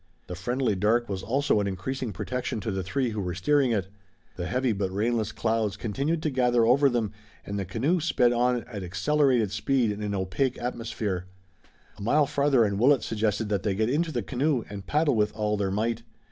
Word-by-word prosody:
The -, -, -7 dB
friendly 120 Hz, +6 st, -1 dB
dark 110 Hz, +5 st, +2 dB
was 95 Hz, -2 st, -3 dB
also 135 Hz, +1 st, +1 dB
an 100 Hz, -, 0 dB
increasing 115 Hz, +6 st, -3 dB
protection 125 Hz, +4 st, -3 dB
to 110 Hz, -, -3 dB
the 95 Hz, 0 st, -2 dB
three 115 Hz, +7 st, -1 dB
who 105 Hz, -1 st, -3 dB
were 90 Hz, -2 st, -3 dB
steering 140 Hz, +7 st, +2 dB
it. 100 Hz, -5 st, 0 dB, 0.5 s
The 90 Hz, -1 st, -4 dB
heavy 130 Hz, -1 st, +1 dB
but 100 Hz, -2 st, -1 dB
rainless 110 Hz, +2 st, 0 dB
clouds 110 Hz, -4 st, -1 dB
continued 140 Hz, +10 st, -2 dB
to 155 Hz, -, 0 dB
gather 125 Hz, -3 st, +3 dB
over 135 Hz, +4 st, +5 dB
them, 115 Hz, -4 st, -1 dB, 0.3 s
and 100 Hz, 0 st, -3 dB
the 100 Hz, -, -2 dB
canoe 130 Hz, -, 0 dB
sped 125 Hz, -7 st, +2 dB
on 120 Hz, 0 st, +1 dB
at 105 Hz, -5 st, -7 dB
accelerated 115 Hz, +4 st, +1 dB
speed 125 Hz, -1 st, +1 dB
in 105 Hz, +1 st, -5 dB
an 105 Hz, -1 st, -2 dB
opaque 100 Hz, +8 st, -1 dB
atmosphere. 110 Hz, -6 st, -3 dB, 0.7 s
A -, -, -9 dB
mile 145 Hz, +8 st, +3 dB
farther 140 Hz, -3 st, +3 dB
and 100 Hz, -2 st, 0 dB
Willet 135 Hz, +2 st, +4 dB
suggested 110 Hz, 0 st, -1 dB
that 100 Hz, -2 st, 0 dB
they 100 Hz, -3 st, -1 dB
get 110 Hz, +4 st, +1 dB
into 160 Hz, +3 st, 0 dB
the 120 Hz, -6 st, -2 dB
canoe 135 Hz, +1 st, 0 dB
and 100 Hz, -2 st, -7 dB
paddle 150 Hz, -1 st, +2 dB
with 105 Hz, -2 st, +2 dB
all 105 Hz, -1 st, 0 dB
their 100 Hz, -2 st, -1 dB
might. 110 Hz, +4 st, -1 dB
115 Hz, 200 wpm, -27 LUFS, 100-130 Hz, 0.7 s, over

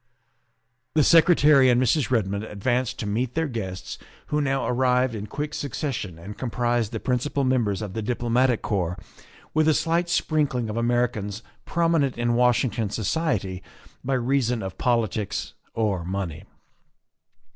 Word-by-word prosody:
The 155 Hz, -, +5 dB
Secretary 150 Hz, -4 st, +6 dB
and 120 Hz, -1 st, +4 dB
Mrs. 130 Hz, +2 st, +2 dB
Redmond 100 Hz, -4 st, 0 dB
advanced 120 Hz, +4 st, -1 dB
to -, -, -4 dB
meet 115 Hz, +4 st, -2 dB
their 160 Hz, 0 st, +1 dB
guests, 95 Hz, -8 st, -5 dB
w -, -, -21 dB
r -, -, -21 dB, 0.2 s
ho 150 Hz, -, +1 dB
now 135 Hz, -2 st, 0 dB
arrived 125 Hz, 0 st, +2 dB
in 105 Hz, -1 st, -5 dB
quick 150 Hz, +6 st, -4 dB
succession 130 Hz, -, -4 dB
and 95 Hz, +5 st, -9 dB
comprised 120 Hz, -2 st, 0 dB
the -, -, -3 dB
principal 130 Hz, +3 st, -1 dB
members 115 Hz, -6 st, +1 dB
of 100 Hz, -3 st, -6 dB
the 110 Hz, -, -3 dB
Diplomatic 120 Hz, +2 st, +1 dB
Corps 90 Hz, -3 st, -1 dB, 0.6 s
with 155 Hz, 0 st, +3 dB
a 155 Hz, -, +4 dB
slight 170 Hz, +2 st, +1 dB
sprinkling 140 Hz, -9 st, 0 dB
of -, -, -5 dB
Americans 115 Hz, -3 st, -1 dB, 0.2 s
prominent 165 Hz, -6 st, +1 dB
in 120 Hz, 0 st, +1 dB
Washington 120 Hz, -2 st, +2 dB
society 105 Hz, -, -1 dB, 0.4 s
by 135 Hz, +1 st, 0 dB
reason 125 Hz, -2 st, 0 dB
of 95 Hz, -1 st, -7 dB
politics 110 Hz, -4 st, -1 dB, 0.2 s
or 105 Hz, -6 st, 0 dB
money. 90 Hz, -1 st, -4 dB
120 Hz, 145 wpm, -25 LUFS, 105-135 Hz, 0.6 s, Secretary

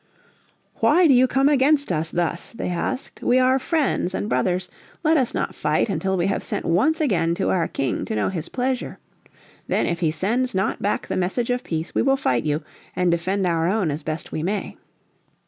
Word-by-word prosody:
"Why 360 Hz, +1 st, +4 dB
do 290 Hz, -, +6 dB
you 255 Hz, +1 st, +5 dB
come 270 Hz, +2 st, +2 dB
against 285 Hz, -2 st, +3 dB
us 160 Hz, -1 st, -1 dB
thus?" 175 Hz, +3 st, -2 dB
they 230 Hz, -, -4 dB
asked. 180 Hz, +9 st, -3 dB
"We 245 Hz, -, +3 dB
are 255 Hz, +1 st, +4 dB
friends 275 Hz, -, 0 dB
and -, -, -2 dB
brothers. 180 Hz, -3 st, 0 dB, 0.4 s
Let 320 Hz, 0 st, +4 dB
us 260 Hz, -6 st, +1 dB
not -, -, -2 dB
fight 150 Hz, +8 st, 0 dB
until 190 Hz, +1 st, -1 dB
we 175 Hz, -, +1 dB
have 195 Hz, -, -1 dB
sent -, -, -3 dB
once 265 Hz, -, +2 dB
again 170 Hz, -, +1 dB
to 190 Hz, -, 0 dB
our 170 Hz, -3 st, +1 dB
King 135 Hz, -2 st, -2 dB
to -, -, -3 dB
know 105 Hz, -, +1 dB
his 175 Hz, -5 st, -5 dB
pleasure. 255 Hz, 0 st, -2 dB, 0.7 s
Then -, -, +1 dB
if 170 Hz, 0 st, -1 dB
he 165 Hz, -3 st, +2 dB
sends 225 Hz, +10 st, -1 dB
not 190 Hz, -, 0 dB
back 205 Hz, -, -1 dB
the -, -, -3 dB
message 195 Hz, +7 st, -1 dB
of 245 Hz, 0 st, -1 dB
peace 160 Hz, 0 st, -4 dB
we -, -, +2 dB
will 270 Hz, +1 st, +3 dB
fight 130 Hz, -, 0 dB
you 150 Hz, +1 st, -1 dB, 0.3 s
and 180 Hz, -1 st, +2 dB
defend 185 Hz, +3 st, 0 dB
our 165 Hz, -2 st, +1 dB
own 190 Hz, -4 st, +1 dB
as 145 Hz, +2 st, -4 dB
best 155 Hz, +1 st, -4 dB
we 155 Hz, -, -3 dB
may." 195 Hz, +5 st, -3 dB
190 Hz, 205 wpm, -23 LUFS, 170-255 Hz, 0.7 s, do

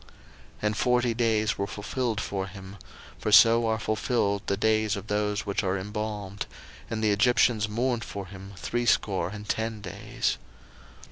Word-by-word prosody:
01:050:003 -, -, -21 dB, 0.5 s
And 105 Hz, 0 st, +1 dB
forty 125 Hz, -1 st, +2 dB
days 110 Hz, -2 st, +1 dB
were 100 Hz, -, 0 dB
fulfilled 110 Hz, +3 st, -2 dB
for 100 Hz, -2 st, -3 dB
him; 95 Hz, +1 st, -10 dB, 0.4 s
for 105 Hz, -, -1 dB
so 115 Hz, +2 st, +7 dB
are 110 Hz, 0 st, +1 dB
fulfilled 110 Hz, -2 st, 0 dB
the 100 Hz, -, +1 dB
days 110 Hz, 0 st, +2 dB
of 100 Hz, 0 st, -6 dB
those 105 Hz, 0 st, -1 dB
which 100 Hz, -1 st, 0 dB
are 95 Hz, 0 st, 0 dB
embalmed: 105 Hz, 0 st, -4 dB, 0.4 s
and 110 Hz, -1 st, -2 dB
the 105 Hz, -, +4 dB
Egyptians 110 Hz, 0 st, +3 dB
mourned 120 Hz, +2 st, 0 dB
for 100 Hz, -1 st, -6 dB
him 95 Hz, +1 st, -10 dB
threescore 110 Hz, -5 st, +1 dB
and 105 Hz, +1 st, -8 dB
ten 110 Hz, 0 st, -1 dB
days. 95 Hz, -3 st, -3 dB
105 Hz, 155 wpm, -27 LUFS, 100-115 Hz, 0.5 s, so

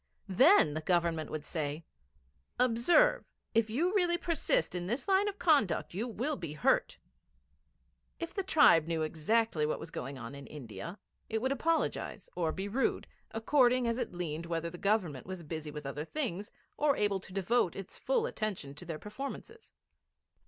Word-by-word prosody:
Then 250 Hz, -, +6 dB
the 155 Hz, -, -3 dB
Government 170 Hz, -2 st, +1 dB
would 155 Hz, -1 st, -5 dB
say: 155 Hz, 0 st, -3 dB, 0.7 s
'Observe; 250 Hz, -, +4 dB, 0.3 s
if 225 Hz, -1 st, +3 dB
you 330 Hz, -, +1 dB
really 350 Hz, -4 st, +3 dB
persist 335 Hz, -, 0 dB
in 175 Hz, -1 st, -3 dB
this 240 Hz, -, -2 dB
line 390 Hz, +1 st, +3 dB
of 405 Hz, -1 st, -3 dB
conduct 220 Hz, -, +2 dB
you 215 Hz, +7 st, -2 dB
will 250 Hz, +6 st, -2 dB
be 165 Hz, -, -6 dB
hurt.' 155 Hz, -, +2 dB, 1.2 s
If 335 Hz, 0 st, -5 dB
the 390 Hz, -, -1 dB
tribe 295 Hz, -, +5 dB
knew 165 Hz, -1 st, 0 dB
exactly 165 Hz, +3 st, +1 dB
what 150 Hz, -, 0 dB
was 165 Hz, -, -8 dB
going 135 Hz, -1 st, -5 dB
on 120 Hz, +1 st, -7 dB
in 140 Hz, 0 st, -9 dB
India, 150 Hz, -, -8 dB, 0.3 s
it 220 Hz, -, 0 dB
would 260 Hz, +4 st, 0 dB
apologise 320 Hz, +4 st, -1 dB
or 165 Hz, -3 st, 0 dB
be 190 Hz, +4 st, -4 dB
rude, 245 Hz, +7 st, 0 dB, 0.2 s
according 245 Hz, +1 st, +3 dB
as 230 Hz, +2 st, 0 dB
it -, -, -2 dB
learned 170 Hz, -2 st, -4 dB
whether 165 Hz, 0 st, -2 dB
the 175 Hz, -, -9 dB
Government 185 Hz, -, 0 dB
was 185 Hz, -2 st, -6 dB
busy 155 Hz, 0 st, -5 dB
with 150 Hz, -1 st, -7 dB
other 145 Hz, +2 st, -4 dB
things, 205 Hz, -, -3 dB, 0.3 s
or 290 Hz, -2 st, +2 dB
able 205 Hz, -2 st, +1 dB
to 190 Hz, -, -11 dB
devote 195 Hz, 0 st, +1 dB
its 195 Hz, 0 st, -8 dB
full -, -, +1 dB
attention 210 Hz, -, -3 dB
to 150 Hz, +5 st, -10 dB
their 165 Hz, -2 st, -4 dB
performances. 275 Hz, -, -8 dB
195 Hz, 170 wpm, -32 LUFS, 160-265 Hz, 1.2 s, Then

